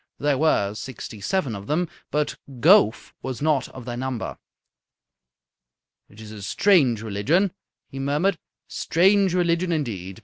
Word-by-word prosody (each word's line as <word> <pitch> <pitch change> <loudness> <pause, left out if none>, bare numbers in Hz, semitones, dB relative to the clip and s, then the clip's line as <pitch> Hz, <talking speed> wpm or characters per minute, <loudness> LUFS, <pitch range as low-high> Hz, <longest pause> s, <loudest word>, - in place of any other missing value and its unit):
There 145 -1 0
were 105 -10 +2
sixty 110 -1 -8
seven 145 - -1
of 100 0 -8
them, 170 +4 0 0.2
but 150 0 -1 0.2
Gowf 180 - +4
was 130 -3 -5
not 145 -3 +1
of 130 -3 -11
their 120 -1 -4
number. 130 -2 -4 1.7
"It 105 - -17
is 110 -1 -10
a 105 -2 -9
strange 130 - +3
religion," 115 - +1 0.4
he 135 - -8
murmured. 145 +8 +1
"A 165 - -23 0.3
strange 190 +2 +2
religion, 175 0 +1
indeed. 110 - -3
140 Hz, 140 wpm, -24 LUFS, 110-170 Hz, 1.7 s, Gowf